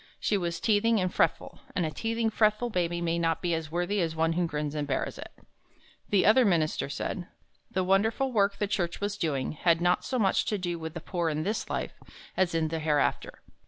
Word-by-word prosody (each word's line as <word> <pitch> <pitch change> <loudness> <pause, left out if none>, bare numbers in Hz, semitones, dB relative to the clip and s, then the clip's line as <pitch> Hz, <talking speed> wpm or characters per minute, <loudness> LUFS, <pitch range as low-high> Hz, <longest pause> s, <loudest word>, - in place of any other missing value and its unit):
She 210 - +1
was 170 -3 -2
teething 225 +1 +3
and 185 -1 -1
fretful, - - 0 0.2
and 175 - +1
a 155 - -2
teething, 225 +6 -1
fretful 215 +2 +2
baby 175 -2 -1
may 170 0 0
not 165 -2 +1
be 175 -2 -1
as 160 -1 -3
worthy 175 +4 0
as 165 -2 -1
one 165 +1 +1
who 175 0 0
grins 150 -2 -3
and 150 -1 -2
bears - - -2
it. - - -8 0.8
The 200 -2 +3
other 235 +5 +6
minister 165 -8 +1
said, 175 +4 -4 0.4
"The 185 - 0
wonderful 220 +8 +2
work 200 -3 +2
the 205 - 0
Church 175 -4 -2
was 205 0 -2
doing, 140 -8 -1
had 165 +2 +2
not 175 +1 +2
so 255 - -2
much 195 -5 +2
to 210 - 0
do 175 -2 -3
with 160 0 -6
the 170 - -5
poor 170 -1 -1
in 155 0 -2
this 210 +5 -2
life, - - -3 0.4
as 180 -3 +1
in 160 -1 +1
the 165 0 -2
hereafter." 150 -2 0
175 Hz, 215 wpm, -28 LUFS, 165-205 Hz, 0.8 s, other